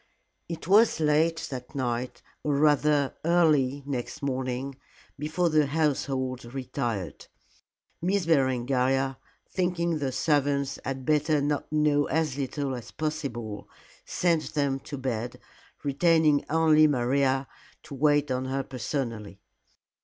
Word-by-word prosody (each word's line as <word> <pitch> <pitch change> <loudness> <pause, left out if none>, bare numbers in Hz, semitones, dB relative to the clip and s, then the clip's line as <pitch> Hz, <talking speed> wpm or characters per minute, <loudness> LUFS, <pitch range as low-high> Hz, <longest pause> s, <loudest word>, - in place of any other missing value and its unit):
It 165 -1 -6
was 210 0 +5
late 160 +2 +2
that 125 +1 -7
night 125 -2 -3 0.2
or 145 -1 0
rather 145 -1 +3
early 150 -5 +3
next 135 -1 -4
morning 130 0 -3 0.4
before 160 +3 0
the 155 -2 +3
household 135 -4 -1
retired. 120 - -4 0.7
Miss 185 +1 +1
Berengaria, 135 -2 +1 0.3
thinking 170 -3 -1
the 135 -2 -1
servants 140 -1 0
had 135 -1 -4
better 150 +1 +2 0.3
know 150 -1 +2
as 155 -4 0
little 140 0 -2
as 120 -3 -7
possible, 135 -9 -4 0.3
sent 170 -3 0
them 140 -2 +1
to 140 +1 -7
bed, 120 -3 -3 0.4
retaining 155 +1 +3
only 155 -1 +5
Maria 135 0 +1 0.4
to - - -10
wait 145 0 +2
on 130 0 -1
her 135 +1 -2
personally. 115 -6 -4
140 Hz, 115 wpm, -27 LUFS, 130-155 Hz, 0.7 s, was